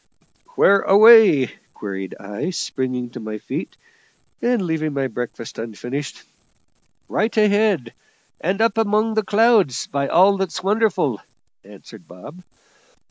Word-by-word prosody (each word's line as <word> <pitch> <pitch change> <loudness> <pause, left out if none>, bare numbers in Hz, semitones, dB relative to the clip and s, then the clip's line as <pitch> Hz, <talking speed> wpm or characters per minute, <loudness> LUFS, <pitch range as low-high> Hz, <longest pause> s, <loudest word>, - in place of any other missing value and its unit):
"Where 200 0 +4
away?" 205 - +6 0.2
queried 95 -2 -7
I, 105 - -5
springing 130 -7 -4
to - - -9
my 110 -1 -6
feet - - -7 0.6
and 240 0 +1
leaving 160 -3 -2
my 135 -1 -1
breakfast 120 -3 -7
unfinished. 120 +6 -6 0.8
"Right 220 +4 -2
ahead, 205 - +1 0.5
and 195 +5 -2
up 225 0 +1
among 215 +1 +1
the 220 - +1
clouds, 210 - +2
by 140 0 -3
all 190 +6 +4
that's 190 -2 -4
wonderful!" 195 - 0 0.4
answered - - -15
Bob. 145 - -13
175 Hz, 120 wpm, -20 LUFS, -, 0.8 s, away